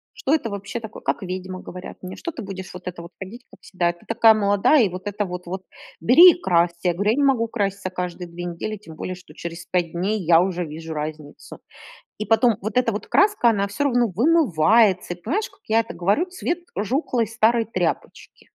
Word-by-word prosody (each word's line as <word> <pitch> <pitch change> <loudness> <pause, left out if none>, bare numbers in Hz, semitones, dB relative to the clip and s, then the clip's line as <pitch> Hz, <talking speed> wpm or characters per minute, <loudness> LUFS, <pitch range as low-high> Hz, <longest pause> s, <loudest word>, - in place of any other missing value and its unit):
"Что 285 - 0
это 235 -8 -1
вообще 200 +4 -5
такое, 220 -1 -10
как - - -1
ведьма",- 185 0 -5
говорят 180 0 -9
мне,- 185 +1 -7
что 340 - -5
ты 265 - -7
будешь 190 -2 -8
вот 180 - -10
это 175 -2 -6
вот 170 +1 -12
ходить 225 +6 -9
как - - -18
всегда, 175 -2 -1
ты 175 - -22
такая 225 -1 +5
молодая, 205 +6 +3
и - - +1
вот 185 +2 -8
это 205 0 -2
вот 180 -1 -6 0.6
бери 325 - +8
и 350 - -9
красься. 170 -1 +2
Я 175 - +2
говорю: 200 +4 +1
"Я - - -1
не 290 - +1
могу 240 -4 +2
краситься 200 -4 -2
каждые 180 -1 -5
2 175 +1 -7
недели, 175 +5 -4
тем 190 -6 -13
более, 185 - -5
что 180 0 -15
через 170 0 -7
5 175 -3 -1
дней 195 +5 -1
я 165 0 +6
уже 180 -1 -2
вижу 160 +1 -8
разницу". 150 -1 -7 0.6
И 215 - -4
потом 225 0 +3
вот 215 +3 -5
эта 245 -2 +3
вот 205 - -5
краска 405 - +3
она 200 -3 0
всё 285 +8 -2
равно 245 -3 +2
вымывается, 215 - +3
и 175 - -20
понимаешь, 375 - -1
как 390 - -26
я 225 +1 +4
это 230 - -6
говорю, 200 - +1
цвет 360 -2 -3 0.2
жухлой 235 +2 0
старой 225 +1 +2
тряпочки. 180 -6 -4
200 Hz, 215 wpm, -22 LUFS, 180-230 Hz, 0.6 s, бери